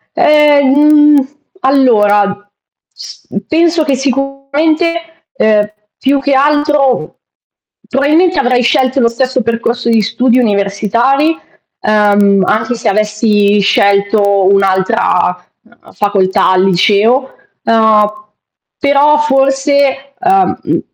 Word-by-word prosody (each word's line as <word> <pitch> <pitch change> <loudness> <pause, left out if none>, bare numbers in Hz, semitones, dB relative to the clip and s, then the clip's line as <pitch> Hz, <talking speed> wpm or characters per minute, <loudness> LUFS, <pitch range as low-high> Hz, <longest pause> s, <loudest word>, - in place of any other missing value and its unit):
Ehm, 295 -2 +3
mhmm, 295 -1 +3 0.3
allora, 205 - +1 0.4
s - - -13 0.2
penso 325 0 +1
che 280 - -1
sicuramente, 290 +5 -3
uhm, 210 -2 +1 0.3
più 275 +1 0
che 275 0 -1
altro 290 -1 0 0.7
probabilmente 305 +6 +1
avrei 250 -2 +1
scelto 260 +1 0
lo 235 - +2
stesso 255 +1 -2
percorso 235 +1 -3
di 225 -1 +2
studi 240 +3 0
universitari, 230 +8 0 0.4
uhm, 205 -2 +2
anche 220 +3 -1
se 225 - -4
avessi 210 0 0
scelto 200 0 +1
un'altra, 190 -1 0 0.2
uhm, 235 +1 -23
facoltà 195 -2 0
al 185 0 +2
liceo, 210 +8 +1 0.3
uhm, 215 -2 +1 0.5
però 285 +1 +2
forse, 275 -1 0
uhm, 375 +1 +1
mhmm - - -2
250 Hz, 100 wpm, -11 LUFS, 210-280 Hz, 0.7 s, Ehm